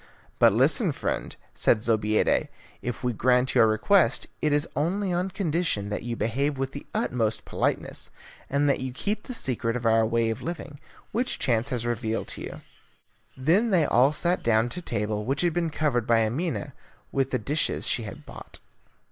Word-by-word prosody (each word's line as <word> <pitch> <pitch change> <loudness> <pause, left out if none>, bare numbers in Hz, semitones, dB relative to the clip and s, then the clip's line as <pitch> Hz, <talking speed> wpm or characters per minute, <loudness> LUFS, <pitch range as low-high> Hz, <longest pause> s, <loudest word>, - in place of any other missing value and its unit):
"But - - +7
listen, - - +3
friend," - - -3 0.2
said 105 -2 +2
Zobeida, 110 -2 +2 0.3
"if 125 +1 -5
we 125 -1 0
grant 125 +3 +2
your 110 - +6
request, 130 - +3 0.2
it 150 - +1
is 145 +2 +1
only 180 +6 0
on 180 +2 0
condition 165 - -1
that 105 - -3
you 120 0 -4
behave 135 +6 -1
with 135 0 -2
the 140 - -9
utmost 115 -3 -1
politeness, - - -2 0.4
and 140 +1 +2
that 140 - +2
you 130 -1 -4
keep 205 +11 -2
the 255 - -5
secret 115 - -1
of 120 - -7
our 115 0 +4
way 115 0 +1
of 115 +3 -5
living, 150 -3 -6 0.3
which 245 +4 0
chance 120 +1 +1
has 120 -3 -2
revealed 115 -1 -2
to - - -5
you." - - -7 0.8
Then 175 - +3
they 175 -6 +4
all 130 +3 +4
sat 175 +4 +1
down 115 +1 +2
to 180 - -5
table, 105 -7 -2
which 135 +5 -1
had 175 -2 +2
been 170 -1 0
covered 145 -7 0
by 115 -1 +4
Amina 150 +4 -2 0.4
with 135 -1 0
the 130 - 0
dishes 145 +6 0
she - - +1
had 105 -3 -8
bought. - - -10
130 Hz, 180 wpm, -26 LUFS, 115-160 Hz, 0.8 s, But